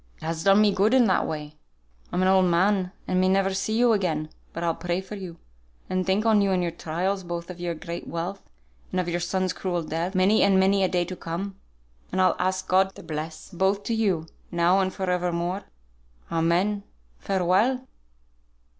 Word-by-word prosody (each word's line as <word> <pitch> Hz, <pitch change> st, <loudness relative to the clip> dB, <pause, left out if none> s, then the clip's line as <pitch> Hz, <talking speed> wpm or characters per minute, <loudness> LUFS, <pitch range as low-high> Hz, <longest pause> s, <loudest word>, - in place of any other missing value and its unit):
It -, -, -16 dB
has 165 Hz, 0 st, -3 dB
done 195 Hz, +2 st, +6 dB
me 210 Hz, -2 st, +4 dB
good 210 Hz, +6 st, +3 dB
in 255 Hz, -2 st, +6 dB
that 190 Hz, -, +2 dB
way. 150 Hz, -1 st, -6 dB, 0.5 s
I'm 180 Hz, -, +1 dB
an -, -, +3 dB
old 190 Hz, 0 st, +5 dB
man, 185 Hz, +2 st, +2 dB, 0.2 s
and 185 Hz, 0 st, +2 dB
may 185 Hz, -, +3 dB
never 195 Hz, 0 st, +2 dB
see 215 Hz, +3 st, -1 dB
you 240 Hz, -1 st, +5 dB
again; 160 Hz, -7 st, -1 dB, 0.2 s
but 170 Hz, -, -5 dB
I'll 165 Hz, -1 st, +1 dB
pray 175 Hz, +1 st, -2 dB
for 190 Hz, +2 st, -9 dB
you, 185 Hz, -5 st, -7 dB, 0.5 s
and 185 Hz, 0 st, 0 dB
think 195 Hz, +3 st, +1 dB
on 220 Hz, -2 st, +5 dB
you 200 Hz, -, +2 dB
and 185 Hz, -2 st, +1 dB
your 170 Hz, -, -1 dB
trials, 180 Hz, +4 st, -2 dB
both 170 Hz, 0 st, -5 dB
of 180 Hz, -, -11 dB
your 175 Hz, -1 st, -2 dB
great 170 Hz, +1 st, -7 dB
wealth, 175 Hz, +4 st, -4 dB, 0.5 s
and 185 Hz, -, -1 dB
of 180 Hz, -, -1 dB
your 175 Hz, 0 st, -1 dB
son's 185 Hz, +1 st, -1 dB
cruel 175 Hz, -3 st, -2 dB
death, 165 Hz, +5 st, -3 dB
many 190 Hz, +4 st, +4 dB
and 195 Hz, -1 st, +4 dB
many 195 Hz, +1 st, +3 dB
a -, -, +4 dB
day 180 Hz, -1 st, 0 dB
to 185 Hz, -, -6 dB
come; 180 Hz, +4 st, -5 dB, 0.6 s
and 185 Hz, -, -1 dB
I'll 185 Hz, -, +4 dB
ask 185 Hz, +1 st, -1 dB
God 190 Hz, +1 st, +3 dB
to -, -, -11 dB
bless 155 Hz, +1 st, -6 dB
both 190 Hz, +2 st, +1 dB
to 230 Hz, -, -2 dB
you 195 Hz, -8 st, +1 dB, 0.2 s
now 175 Hz, +2 st, +3 dB
and 190 Hz, -1 st, +1 dB
for 190 Hz, 0 st, -4 dB
evermore. 180 Hz, +1 st, -1 dB, 0.7 s
Amen. 175 Hz, +5 st, +1 dB, 0.4 s
Farewell!" 195 Hz, +8 st, +1 dB
185 Hz, 200 wpm, -25 LUFS, 170-195 Hz, 0.7 s, done